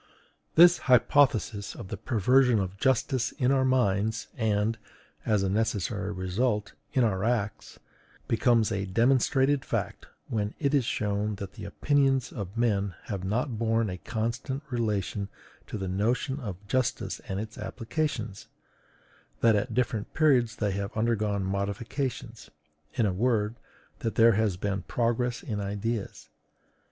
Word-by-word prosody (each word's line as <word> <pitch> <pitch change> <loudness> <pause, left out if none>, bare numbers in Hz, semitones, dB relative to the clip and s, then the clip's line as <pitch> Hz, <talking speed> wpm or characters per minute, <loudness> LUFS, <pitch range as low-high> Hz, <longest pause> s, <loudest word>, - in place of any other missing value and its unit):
This 175 +1 +8
hypothesis 125 -5 +3
of 95 - -9
the - - -3
perversion 125 +1 +3
of 95 0 -3
justice 130 -2 +1
in 130 -3 +1
our 135 -1 +3
minds, 110 -4 +1
and, 110 0 0 0.5
as 105 -3 +2
a - - +1
necessary 105 -1 -1
result, 105 +3 -1 0.2
in 130 - +3
our 95 -4 +1
acts, 110 -3 -2 0.5
becomes 115 -2 +3
a 100 -1 -2
demonstrated 135 +5 +3
fact - - -3 0.2
when 105 -2 -2
it 140 -2 0
is 140 -5 +3
shown 105 -1 -1
that 100 -2 -7
the - - -8
opinions 135 -3 +1
of 100 +1 -6
men 100 -6 +1
have 100 -4 -5
not 110 +4 -1
borne 115 -2 +1
a 90 - -6
constant 120 +7 -3
relation 105 -4 -1 0.4
to - - -5
the 95 -2 -4
notion 120 +9 0
of 100 -5 -7
justice 130 +3 -1
and 95 0 -3
its 110 +1 -7
applications; 115 -5 -3 0.9
that 115 -2 +5
at 110 +2 -1
different 115 -4 -1
periods 130 -8 +3
they 105 -3 -1
have 100 +2 -4
undergone 110 -3 +1
modifications: 100 +7 -3 0.5
in 115 - +2
a 95 - +1
word, 110 +1 +1 0.5
that 115 - -3
there 115 0 +6
has 105 -3 +1
been 100 0 -2
progress 120 +3 -1
in 105 -2 -3
ideas. 105 +2 -4
110 Hz, 140 wpm, -28 LUFS, 100-125 Hz, 0.9 s, This